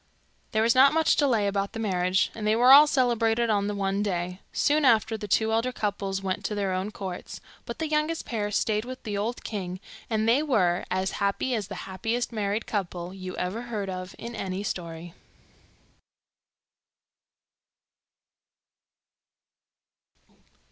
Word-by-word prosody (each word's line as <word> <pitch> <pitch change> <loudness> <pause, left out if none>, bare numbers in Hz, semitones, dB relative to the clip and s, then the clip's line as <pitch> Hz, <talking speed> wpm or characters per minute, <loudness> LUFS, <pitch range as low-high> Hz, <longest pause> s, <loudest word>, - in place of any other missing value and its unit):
There 220 0 +2
was 230 +1 +4
not 270 +2 +6
much 320 -1 +4
delay 240 -8 +2
about 200 0 -1
the 225 - -5
marriages, 185 -3 +1
and 215 -2 -4
they 215 - +3
were 245 +3 +6
all 295 +2 +9
celebrated 235 -4 +2
on 200 -1 +1
the 205 - -2
one 195 0 -1
day. 180 -2 -2
Soon 300 +1 +2
after, 225 -3 +4
the 210 -1 -6
two 220 +4 +2
elder 230 +3 +1
couples 200 -4 -3
went 190 -1 -2
to 210 - -2
their 200 -2 -1
own 185 +2 -2
courts, 190 -4 -7 0.3
but - - -5
the 320 - -2
youngest 305 +2 -1
pair 210 -3 -2
stayed 210 +1 0
with 255 +1 -8
the 210 -3 -4
old 220 +4 -3
king, 185 -4 -5 0.3
and 220 -1 0
they 245 +5 +4
were 190 - +1
as 185 +1 -1
happy 200 +6 0
as 210 -5 -2
the 195 - -7
happiest 225 +6 -2
married 210 0 -2
couple 180 -3 -4
you 185 -1 -7
ever 185 +6 -2
heard 215 -5 -4
of 185 0 -6
in 235 +1 -7
a 190 -1 -3
story. 170 -3 -5
210 Hz, 155 wpm, -26 LUFS, 190-235 Hz, 0.3 s, all